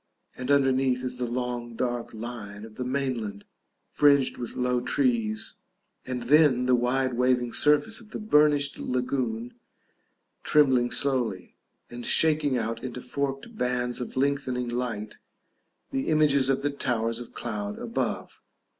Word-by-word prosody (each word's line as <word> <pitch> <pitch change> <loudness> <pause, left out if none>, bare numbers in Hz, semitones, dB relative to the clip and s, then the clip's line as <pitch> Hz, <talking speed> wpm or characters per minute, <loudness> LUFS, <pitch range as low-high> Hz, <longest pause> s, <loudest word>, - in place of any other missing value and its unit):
And 125 +1 -6
underneath 135 -2 +3
is 125 0 -3
the 125 - -1
long 120 -1 -3
dark 120 0 -2
line 110 -2 -7
of 110 - -12
the 125 - -5
mainland, 125 -6 -3 0.5
fringed 140 -2 +3
with 120 - -6
low 125 0 +1
trees; 115 -5 0 0.5
and 125 -1 -3
then 135 -1 +4
the 130 - +3
wide 125 +1 +1
waving 125 -1 +1
surface 150 +10 +2
of 220 - -14
the - - -6
burnished 150 -8 +3
lagoon 125 -2 -2 0.9
trembling 130 -5 +4
slowly, 120 -6 -1 0.4
and 120 0 -7
shaking 150 -3 +3
out 115 0 -3
into 125 -1 -5
forked 140 - -4
bands 125 - -1
of 125 - -6
lengthening 130 -3 0
light 120 -4 -4 0.7
the 135 - -2
images 145 -4 +3
of 135 0 +1
the 145 - +1
towers 115 -4 -1
of 120 - -10
cloud 105 -3 -4
above. - - -3
125 Hz, 135 wpm, -27 LUFS, 120-140 Hz, 0.9 s, then